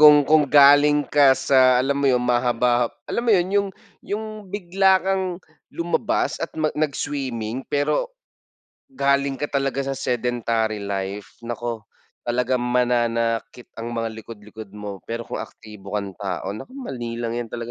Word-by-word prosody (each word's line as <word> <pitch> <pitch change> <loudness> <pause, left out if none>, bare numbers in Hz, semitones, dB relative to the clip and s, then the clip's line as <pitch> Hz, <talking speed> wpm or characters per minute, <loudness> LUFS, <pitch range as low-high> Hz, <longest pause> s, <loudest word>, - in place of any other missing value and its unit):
kung 150 -1 +8
kung 150 -1 +4
galing 145 +1 +6
ka 140 -2 +5
sa 130 -1 +4
alam 140 +2 +1
mo 140 - +2
yun, 125 -1 +2
mahaba-ha 120 -1 +2 0.2
alam 235 - -2
mo - - +6
yun, 175 +1 +1
yung 200 -1 +2 0.3
yung 215 +2 -4 0.2
bigla 190 0 +3
kang 190 0 +1 0.4
lumabas 170 +1 -1
at - - -2
ma 155 -1 0
nag-swimming 135 -5 -3
pero 145 - 0 0.8
galing 140 - +1
ka 145 - -1
talaga 135 -1 -1
sa 135 - -1
sedentary 115 -4 -1
life, 100 0 -5
naku, 120 -1 -3 0.5
talagang 125 +1 +1
mananakit 120 -1 0
ang 120 +1 -5
mga 115 -1 -1
likod-likod 105 -2 -11
mo 105 -2 -7
pero 115 0 -4
kung - - -6
aktibo 105 -2 -9
kang 100 -1 -2
tao, 95 -1 -4
naku, 110 - -8
madali 125 - -5
lang 115 0 -2
yan 120 - -3
talaga. 120 +1 -6
125 Hz, 150 wpm, -23 LUFS, 115-145 Hz, 0.8 s, kung